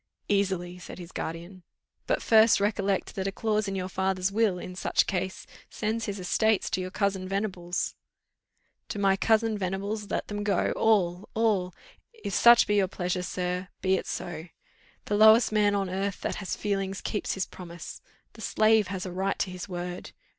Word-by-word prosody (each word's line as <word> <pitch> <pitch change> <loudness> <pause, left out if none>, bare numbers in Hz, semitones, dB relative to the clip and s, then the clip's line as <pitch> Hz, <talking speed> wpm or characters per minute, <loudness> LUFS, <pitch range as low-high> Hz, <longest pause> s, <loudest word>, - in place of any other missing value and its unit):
"Easily," 190 -3 0
said 175 - -9
his 175 -1 -9
guardian. 170 +3 -6 0.5
"But - - 0
first, 220 -1 +6
recollect 200 -1 0
that 190 0 -3
a - - -1
clause 215 0 0
in 195 - -3
your 185 -1 -2
father's 190 0 0
will, 210 -3 +2
in 180 +1 -7
such - - +2
case, 190 -1 -3 0.2
sends 220 +1 -2
his 200 -1 -4
estates 215 +3 +1
to 185 +2 0
your 185 - -4
cousin 195 -1 -1
Venables." 185 -3 -2 1.0
"To - - -4
my 195 -1 +3
cousin 220 +1 +2
Venables 200 +3 -3
let - - -2
them 205 0 -4
go 200 -3 +1
all 190 -4 +2
all; 200 -6 +1 0.4
if 440 - -6
such 235 0 +7
be 210 - +1
your 195 -2 +3
pleasure, 180 0 -2
sir, 180 0 -3 0.2
be 190 - +3
it - - 0
so. 175 -1 -5 0.6
The 205 - 0
lowest 220 +2 +7
man 205 -1 +3
on 195 -1 0
earth 195 +1 -3
that - - -2
has 195 -3 -3
feeling 195 -2 -1
keeps 200 +2 -3
his 190 - -1
promise. 170 -2 -9 0.3
The 225 - -13
slave 215 0 +3
has 190 0 -4
a 185 - -5
right 190 +2 -1
to 185 - -1
his 180 +1 -7
word! 180 0 -6
195 Hz, 180 wpm, -28 LUFS, 185-210 Hz, 1.0 s, such